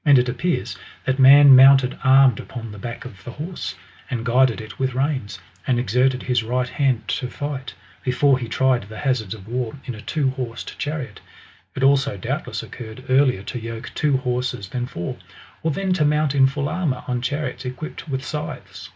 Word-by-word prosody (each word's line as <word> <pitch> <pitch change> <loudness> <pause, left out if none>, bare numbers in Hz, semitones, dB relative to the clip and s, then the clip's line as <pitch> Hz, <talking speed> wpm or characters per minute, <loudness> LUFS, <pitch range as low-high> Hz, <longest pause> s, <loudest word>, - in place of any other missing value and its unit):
And 145 -3 +6
it 125 0 +3
appears 125 - -1 0.3
that 130 +1 0
man 140 +1 +9
mounted 135 -1 +7
armed 130 -3 +6
upon 115 -3 -7
the 105 - -10
back 120 +3 -7
of 100 -5 -12
a - - -3
horse, 160 +8 -6 0.3
and 120 -4 -3
guided 125 0 +3
it 110 -2 -10
with 130 -1 -1
reins, 130 -7 -1 0.3
and 125 - +2
exerted 125 +2 +1
his 125 -2 +1
right 125 +3 -1
hand 125 -5 0
to 125 0 -1
fight, 140 -1 -5 0.3
before 130 +1 +3
he 120 - -4
tried 130 +2 +2
the 110 - -9
hazards 120 -7 -1
of 100 -2 -13
war 120 0 -3
in 125 - -4
a 105 - -9
two 140 -1 0
horsed 125 -3 -6
chariot. 145 -8 -4 0.6
It 135 - -2
also 135 -4 +3
doubtless 90 - -4
occurred 115 +1 -9
earlier 130 -6 +3
to 120 - -5
yoke 115 +2 -7
two 145 -3 +2
horses 125 -6 -3
than 125 +1 -3
four, 85 -7 -5 0.4
or 160 - 0
than 185 +5 0
to 175 -4 +1
mount 150 -1 +2
in 135 -1 +5
full 140 +1 -2
armour 150 -7 -2
on 125 -1 -1
chariots 130 -1 -3
equipped 145 +5 -7
with 130 0 -3
scythes. 150 +1 -6
130 Hz, 190 wpm, -22 LUFS, 120-140 Hz, 0.6 s, man